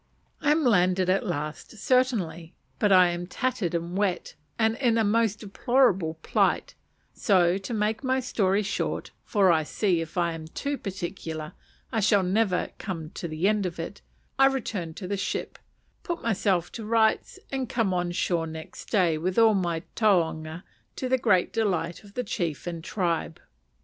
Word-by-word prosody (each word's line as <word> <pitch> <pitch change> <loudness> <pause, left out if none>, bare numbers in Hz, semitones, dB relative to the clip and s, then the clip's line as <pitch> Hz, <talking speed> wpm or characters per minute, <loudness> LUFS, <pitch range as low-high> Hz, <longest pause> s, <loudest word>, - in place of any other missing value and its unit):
I - - +2
am 310 +1 +3
landed 185 -5 +3
at 195 +3 +1
last, 155 +5 -4
certainly; 195 -10 0 0.2
but 210 -2 +3
I 185 -2 +7
am 175 0 -4
tattered 225 -5 -1
and 170 +1 -3
wet, 195 -2 -1 0.2
and 220 0 +2
in 240 -4 +2
a 225 - +3
most 215 0 +1
deplorable 200 -6 +2
plight: - - +1 0.4
so, 185 -2 +3
to 195 +4 -7
make 215 +2 -1
my 260 0 +1
story 205 -5 +1
short 205 - -3
for 195 -4 +4
I 160 -2 +3
see, 175 +2 0
if 165 +2 -7
I 170 -1 +1
am 160 -1 -7
too 285 - -3
particular, 175 - -5 0.4
I 225 - 0
shall 205 -1 +4
never 185 0 +1
come 165 -5 -5
to 170 - -5
the 160 +4 0
end 210 -2 +2
of 170 -1 -7
it 165 +4 -6 0.4
I 270 - +8
returned 205 -11 -3
to 185 - -6
the 200 +1 -2
ship, 190 - -3 0.4
put 350 -5 -4
myself 195 -5 +1
to 225 - -7
rights, 220 - +1
and 265 -3 -2
came 225 -6 +1
on 175 -1 0
shore 170 -1 0
next 160 0 -8
day 175 -7 +2
with 180 +3 -2
all 225 -1 +6
my 175 -4 -1
taonga, 170 -5 +1 0.3
to 255 - -3
the 260 0 +3
great 195 -7 +2
delight 180 -7 -1
of 200 -1 -16
the 250 - -1
chief 170 - -3
and 170 -2 -5
tribe. 170 -4 -2
190 Hz, 175 wpm, -26 LUFS, 170-225 Hz, 0.4 s, I